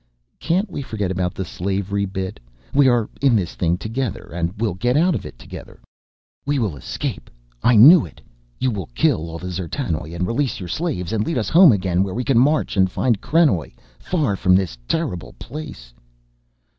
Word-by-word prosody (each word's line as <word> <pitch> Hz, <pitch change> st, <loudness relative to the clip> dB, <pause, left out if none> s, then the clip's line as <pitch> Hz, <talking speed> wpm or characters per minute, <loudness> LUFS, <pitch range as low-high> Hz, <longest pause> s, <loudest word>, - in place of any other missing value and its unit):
"Can't 185 Hz, +6 st, 0 dB
we 165 Hz, -, -6 dB
forget 105 Hz, -7 st, -3 dB
about 90 Hz, 0 st, -2 dB
the 95 Hz, -, -4 dB
slavery 100 Hz, +2 st, -2 dB
bit? 95 Hz, 0 st, -5 dB, 0.3 s
We 140 Hz, -1 st, +5 dB
are 120 Hz, -3 st, +2 dB
in 135 Hz, -4 st, +4 dB
this 95 Hz, -6 st, -1 dB
thing 85 Hz, 0 st, 0 dB
together 115 Hz, +4 st, -4 dB
and 85 Hz, 0 st, -1 dB
we'll 110 Hz, -3 st, -1 dB
get 120 Hz, +8 st, 0 dB
out 175 Hz, +3 st, +3 dB
of -, -, -4 dB
it -, -, -12 dB
together." -, -, -11 dB, 0.6 s
"We 145 Hz, +1 st, 0 dB
will 105 Hz, -, -1 dB
escape, 65 Hz, -, -5 dB, 0.3 s
I 120 Hz, -, +4 dB
knew 145 Hz, -, +9 dB
it. -, -, -17 dB, 0.4 s
You 130 Hz, -, 0 dB
will 95 Hz, -7 st, -5 dB
kill 80 Hz, +6 st, +1 dB
all 80 Hz, -, -6 dB
the 90 Hz, -, -9 dB
D'zertanoj 85 Hz, -, -4 dB
and 90 Hz, -, -1 dB
release 125 Hz, +6 st, -1 dB
your 90 Hz, -3 st, -7 dB
slaves 110 Hz, -, -3 dB
and 105 Hz, -1 st, +1 dB
lead 165 Hz, +2 st, -2 dB
us 110 Hz, -5 st, -1 dB
home 175 Hz, -2 st, +7 dB
again 95 Hz, -3 st, +1 dB
where 95 Hz, 0 st, -2 dB
we 125 Hz, -, -1 dB
can 130 Hz, -2 st, +3 dB
march 150 Hz, +1 st, +2 dB
and 95 Hz, -1 st, +4 dB
find 115 Hz, +2 st, 0 dB
krenoj 150 Hz, -, +2 dB, 0.3 s
far 150 Hz, -, -1 dB
from 90 Hz, -1 st, +3 dB
this 95 Hz, -9 st, 0 dB
terrible 90 Hz, -, -2 dB
place." 145 Hz, -, -9 dB
105 Hz, 190 wpm, -21 LUFS, 90-135 Hz, 0.6 s, knew